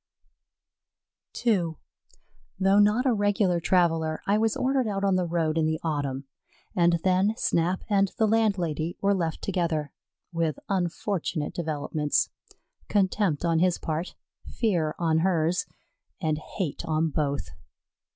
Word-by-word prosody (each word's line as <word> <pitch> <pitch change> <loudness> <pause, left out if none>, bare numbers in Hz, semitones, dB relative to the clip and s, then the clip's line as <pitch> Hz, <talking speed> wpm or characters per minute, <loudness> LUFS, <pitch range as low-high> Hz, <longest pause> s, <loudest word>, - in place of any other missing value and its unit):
II 180 -8 +2 0.9
Though 195 +1 +4
not 210 +5 +4
a 255 - +4
regular 205 -4 +2
traveller, 165 -3 +1
I 200 - +2
was 225 0 +1
ordered 260 -2 +1
out 200 -1 -2
on 195 -1 +3
the 180 -1 0
road 165 -1 0
in 155 - +2
the 160 0 -1
autumn, 145 -4 -2 0.5
and 170 -1 +4
then 190 +3 +2
Snap 175 +2 0
and 200 -2 +2
the 220 - +3
landlady 180 -8 0
were 200 0 +2
left 165 -4 -2
together, 165 -6 -1 0.4
with 165 -4 0
unfortunate 175 -3 -2
developments. 155 -2 -1 0.6
Contempt 190 -5 +1
on 165 -1 +2
his 180 0 +2
part 160 +2 -4 0.3
fear 170 -9 0
on 160 -2 +2
hers; 170 -1 +1 0.5
and 155 -3 0
hate 165 -1 -4
on 160 0 0
both. 140 - -1
175 Hz, 130 wpm, -26 LUFS, 160-195 Hz, 0.9 s, Though